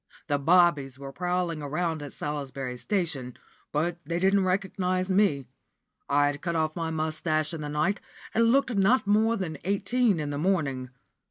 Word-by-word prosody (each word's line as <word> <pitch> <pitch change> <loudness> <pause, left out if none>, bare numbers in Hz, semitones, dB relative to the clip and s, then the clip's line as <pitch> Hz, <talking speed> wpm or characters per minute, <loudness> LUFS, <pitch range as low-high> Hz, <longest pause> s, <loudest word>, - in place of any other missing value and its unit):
The 145 -2 0
bobbies 155 -4 +3
were 135 0 -8
prowling 175 -1 -1
about 155 +2 -2
at 145 - -7
Salisbury 140 -3 -4
station, 145 - -2 0.3
but 170 +3 -1
they 170 +3 -2
didn't 190 +1 +3
recognise 185 0 0
me. 185 -9 +2 0.6
I'd 145 0 +2
cut 170 -2 -2
off 155 -1 0
my 165 -1 -2
moustache 155 0 -1
in 160 - -5
the 150 - -4
night, 155 +7 0 0.3
and 230 +1 +4
looked 270 -1 +2
not 210 +5 +3
more 220 +3 +3
than 160 -7 -4
eighteen 200 +2 +1
in 150 -1 -3
the 145 - -3
morning. 145 -8 0
165 Hz, 160 wpm, -27 LUFS, 145-190 Hz, 0.6 s, and